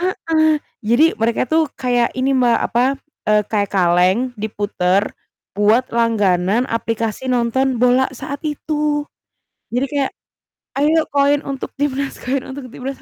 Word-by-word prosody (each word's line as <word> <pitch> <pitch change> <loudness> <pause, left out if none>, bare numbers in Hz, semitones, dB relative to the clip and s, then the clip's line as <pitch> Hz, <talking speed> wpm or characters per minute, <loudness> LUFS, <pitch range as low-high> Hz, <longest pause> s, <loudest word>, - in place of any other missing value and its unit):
Heeh, 320 -4 +1 0.2
jadi 235 +7 +3 0.2
mereka 225 +1 +1
tuh 320 0 +3
kayak 245 -2 +1
ini 265 +1 +1
Mbak, 245 -3 +3
apa, 240 +1 +1 0.4
eee, 210 0 +4
kayak 205 -2 0
kaleng 180 +1 +3 0.2
diputer 200 -3 0 0.5
buat 210 +5 +3
langganan 215 -2 +2
aplikasi 230 +1 -3
nonton 250 +1 +1
bola 250 +2 +3
saat 280 0 -5
itu. 295 0 -1 0.7
Jadi 250 +4 0
kayak, 280 -2 0 0.7
"Ayo 310 +3 +3
koin 285 0 +2
untuk 275 -1 -6
Timnas 280 -1 -2
koin 260 +1 -1
untuk 265 -1 -8
Timnas." 265 +3 -7
250 Hz, 130 wpm, -19 LUFS, 220-280 Hz, 0.7 s, eee